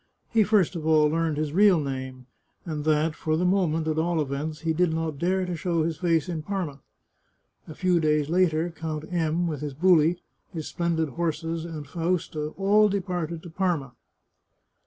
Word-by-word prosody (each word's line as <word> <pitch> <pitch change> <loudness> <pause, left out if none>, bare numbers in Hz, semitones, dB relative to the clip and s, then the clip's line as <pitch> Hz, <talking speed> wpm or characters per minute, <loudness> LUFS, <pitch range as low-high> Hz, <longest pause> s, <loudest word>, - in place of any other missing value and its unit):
He 225 - +4
first 200 -4 +2
of 165 - -4
all 155 -1 +5
learned 160 -1 0
his 150 -1 -2
real 195 -1 +5
name, 130 -2 -5 0.4
and 155 -3 -4
that, 155 +1 +2
for 155 0 -1
the 180 - 0
moment, 170 -4 +1
at 155 0 0
all 170 0 +1
events, 150 +2 -3
he 165 -1 0
did 175 +1 +2
not 160 -3 -3
dare 185 +2 +1
to 180 -1 -3
show 170 0 0
his 160 0 -2
face 170 -1 +1
in 170 -3 -3
Parma. 170 -5 -4 0.9
A 155 - -9
few 180 -2 +2
days 150 -2 +2
later 170 -1 +1
Count 160 -2 -5
M, 165 0 +1
with 155 -4 -3
his 145 -3 -5
buli, 170 0 +4 0.3
his 160 -3 -5
splendid 165 -2 -1
horses, 165 +1 -2
and 155 -4 -7
Fausta, 165 -1 -2
all 205 +2 +4
departed 180 -4 -3
to 175 - -10
Parma. 165 -8 -1
165 Hz, 180 wpm, -26 LUFS, 155-175 Hz, 0.9 s, all